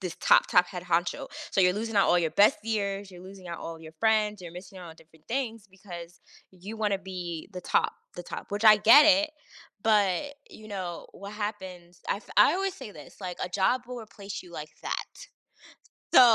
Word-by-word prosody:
this 180 -3 -5
top, - - +6
top 180 0 +5
head 180 -1 -7
honcho. 175 0 0 0.2
So - - +2
you're 180 -1 +5
losing 225 -1 -4
out 200 - +4
all 175 - +5
your - - -3
best 275 +9 +5
years, 200 -3 -2
you're 180 -1 -12
losing 190 -2 -12
out 170 - -5
all 165 0 -7
your 160 0 -11
friends, 215 -2 +2
you're 170 - -9
missing 185 +1 -12
out 175 - -9
on 160 - -14
different 160 -1 -22
things 230 -4 -3
because 175 -3 -11 0.3
you 190 +4 -9
wanna 210 -3 0
be 180 -4 -6
the 180 - -6
top - - +1 0.2
the 175 - -5
top, - - -7
which, 205 +2 -3
I 215 -1 +10
get 230 +8 +8
it, 305 +1 +5 0.5
but, 215 +5 +2 0.2
you 215 - -13
know, 185 -5 -5
what 200 +1 -9
happens 190 -5 -6
I've 205 - -2
I 295 - +7
always 385 0 -1
say 260 - -9
this, 150 -7 -13
like, 180 -2 -6
"A - - -5
job 200 +7 +1
will 250 -1 -6
replace 205 -3 -8
you 180 - -15
like 155 -2 -7
that. - - -3 1.1
So, - - +10
195 Hz, 205 wpm, -28 LUFS, 180-215 Hz, 1.1 s, I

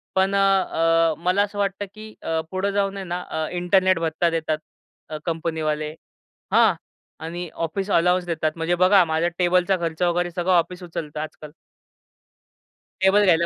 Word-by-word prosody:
पण 190 +1 +2
अ, 165 -4 +3
मला 180 +4 +1
असं 205 0 -6
वाटतं 200 0 -1
की 215 0 -11
अ, 160 0 -1
पुढं 190 +1 -1
जाऊन 195 0 0
आहे 195 - -4
ना 180 0 -3
अ, 160 -1 -2
इंटरनेट 185 0 +2
भत्ता 165 +1 0
देतात 160 -2 -1 0.5
अ, 155 - -4
कंपनीवाले 160 -2 -2 0.6
हां. - - +6 0.5
आणि 175 +1 -5 0.2
ऑफिस 195 +5 -4
अलोवन्स 180 +1 +3
देतात 160 -2 -1
म्हणजे 165 +1 0
बघा 185 +1 +6
माझ्या 160 +1 0
टेबलचा 180 +2 +3
खर्च 165 0 -3
वगैरे 175 0 +1
सगळं 180 +1 0
ऑफिस 180 +1 +1
उचलत 160 -3 -6
आजकाल. 155 0 -7 1.5
टेबल 195 +2 +5
घ्यायला 170 -2 +4
175 Hz, 150 wpm, -23 LUFS, 165-190 Hz, 1.5 s, हां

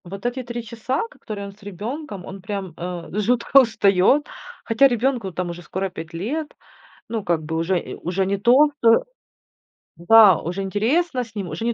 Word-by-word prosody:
Вот 195 +5 -9
эти 245 +2 -1
3 240 -1 -6
часа, 235 +4 -3
ко - - -21
которые 200 -2 -6
он 200 - -10
с 215 - -26
ребенком, 205 - -6
он 195 0 -9
прям, 195 -2 -5
э, 175 0 -6
жутко 240 +5 +4
устает. 215 +4 +3 0.4
Хотя 230 +4 +4
ребенку 240 -4 -1
там 180 +1 -3
уже 170 +1 -9
скоро 190 +2 -4
5 165 -2 -9
лет. 280 - -4 0.5
Ну, 220 -2 -3
как 170 -3 0
бы 160 +1 -4
уже 170 +3 +1
и - - -8
уже 185 +2 -2
не 200 +1 0
то 255 +8 +5 0.2
э - - +7 1.1
да, 205 +1 +7
уже 180 +4 -4
интересно 250 - 0
с 225 -1 -20
ним, 195 -4 -4
уже 160 +9 -5
не 235 - +1
205 Hz, 190 wpm, -22 LUFS, 180-240 Hz, 1.1 s, э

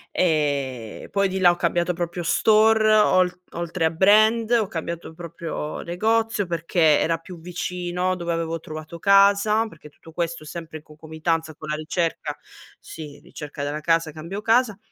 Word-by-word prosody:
Ehm, 140 -9 -1
poi 200 -1 +1
di 190 +1 -3
là 180 -2 +6
ho - - -2
cambiato 175 +1 0
proprio 175 +1 -4
store 215 +4 +4
ol 185 -4 +4 0.2
oltre 170 0 -2
a 160 - +2
brand, 215 +6 +4
ho 230 -4 +3
cambiato 170 -1 -6
proprio 165 -2 -6
negozio, 220 +4 0
perché 165 -2 +2
era 165 0 +1
più 170 +1 -12
vicino 180 +1 -3
dove 170 -1 -2
avevo 165 0 -2
trovato 155 +2 -9
casa, 200 +3 +4
perché 160 -7 -14
tutto 160 +2 -17
questo 170 -1 -3
sempre 160 0 -8
in 155 - -15
concomitanza 160 +1 -3
con 155 0 -10
la 150 - 0
ricerca 165 +2 -3 0.4
sì 150 -3 -10
ricerca 150 -1 -8
della 145 +1 -3
casa, 165 0 +1
cambio 165 +7 -7
casa 225 -2 +2
170 Hz, 155 wpm, -23 LUFS, 160-195 Hz, 0.4 s, là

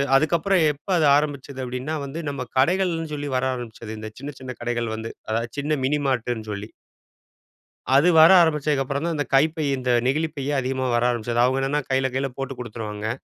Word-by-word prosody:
அதுக்கப்பறம், 170 +5 +3
"எப்ப 145 +1 -24
அது 155 - +3
ஆரம்பிச்சது?" 140 -2 -2
அப்படீன்னா 125 +5 -4
வந்து 140 +4 -6
நம்ம 140 -3 -4
கடைகள்ன்னு 165 +2 +1
சொல்லி 145 0 -4
வர 130 - +1
ஆரம்பிச்சது 115 -2 -8
இந்த 110 0 -6
சின்ன 140 +2 -6
சின்ன 130 -1 -7
கடைகள் 120 -1 -2
வந்து, 110 +1 -6 0.2
அதாவது 115 +1 -1
சின்ன 150 +2 0
மினி 150 +2 +1
மார்ட்டுன்னு 120 -4 -2
சொல்லி. 105 +1 -6 1.3
அது 145 +6 +5
வர 160 +1 +9
ஆரம்பிச்சதுக்கப்பறம் 145 -2 0
தான், 170 - -1
இந்த 145 - 0
கைப்பை 155 +3 +3
இந்த 130 -1 -2 0.2
நெகிழிப்பையே 145 0 -1
அதிகமா 130 0 -2
வர 120 - +2
ஆரம்பிச்சது. 120 0 -1
அவங்க 130 +2 +2
என்னன்னா 140 +2 0
கையில 130 0 +2
கையில 135 +1 0
போட்டு 135 0 -4
குடுத்துருவாங்க. 110 -3 -5
135 Hz, 170 wpm, -23 LUFS, 120-150 Hz, 1.3 s, வர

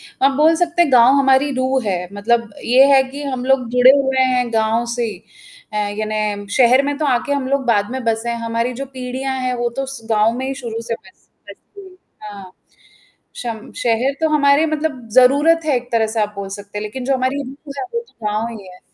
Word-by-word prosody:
हाँ, 270 - 0
अब 270 - -5
बोल 310 +3 +4
सकते 345 0 +2
हैं 330 - 0
गाँव 250 +1 +6
हमारी 270 +1 +3
रूह 260 +1 0
है 200 -3 0 0.2
मतलब 230 +2 0
ये 255 +3 +5
है 265 - +6
कि 285 +2 -7
हम 260 -3 -4
लोग 260 -2 +1
जुड़े 250 +1 +6
हुए 265 -1 +1
हैं 245 -1 -1
गाँव 225 +1 +1
से। 240 -1 -1 0.6
अ, - - -5
यानी 210 0 -2
शहर 255 +1 +5
में 285 0 -1
तो 310 - -1
आके 255 +2 0
हम 280 -2 -1
लोग 275 0 0
बाद 205 -3 +1
में 260 +1 -4
बसे 230 +1 -1
हैं 235 - -2
हमारी 230 +2 -1
जो - - -5
पीढ़ियाँ 260 0 -5
हैं 255 0 -1
वो 240 0 -1
तो 270 - -1
उस 270 -1 -6
गाँव 215 +1 +3
में 260 - -3
ही 270 - -3
शुरू 235 -4 -6
से 230 - -3
बसे 370 - -17
बस - - -21 0.2
गई 375 -2 -12 0.3
हाँ, 200 -3 -10 0.8
शम 230 -3 -6
शहर 240 +4 +1
तो 320 - +2
हमारे 290 +1 +3
मतलब 300 -6 -3
ज़रूरत 285 +7 +5
है 290 -4 +2
एक 245 0 -6
तरह 225 -1 +2
से 220 0 -2
आप 210 0 -3
बोल 200 -1 -5
सकते 205 0 -8
हैं - - -4
लेकिन 230 +5 -6
जो 270 +1 +1
हमारी 260 +2 -1
रूह 280 +2 -10
है - - -3
वो 470 - 0
तो 225 - -9
गाँव 215 +2 -1
ही 195 -2 -13
हैं। 180 0 -15
250 Hz, 230 wpm, -18 LUFS, 225-275 Hz, 0.8 s, गाँव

